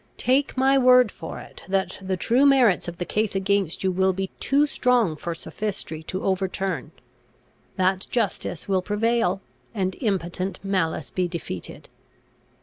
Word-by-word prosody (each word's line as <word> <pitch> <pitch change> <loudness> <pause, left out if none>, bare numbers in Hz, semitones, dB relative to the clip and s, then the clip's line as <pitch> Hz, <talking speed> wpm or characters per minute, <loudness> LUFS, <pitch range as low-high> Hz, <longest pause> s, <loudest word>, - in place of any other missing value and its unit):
Take 265 +2 +1
my 270 +1 +4
word 250 -3 +6
for 160 - -8
it, - - -12
that 190 -1 -1
the 190 -1 -2
true 240 +9 +2
merits 260 -11 +4
of 170 0 -6
the 175 - -3
case 210 +1 -1
against 195 -3 0
you 190 - +2
will 190 +1 +2
be 190 +1 -3
too 285 +2 +3
strong 245 - +2
for 170 +2 -4
sophistry 190 -4 -5
to 185 +4 -5
overturn; 190 0 -1 0.9
that 190 0 +1
justice 200 -7 -2
will 190 -2 +2
prevail, 210 -1 +1 0.3
and 190 -2 -1
impotent 190 -3 -2
malice 175 -7 -1
be 185 -1 0
defeated. 165 - -6
195 Hz, 145 wpm, -24 LUFS, 185-230 Hz, 0.9 s, word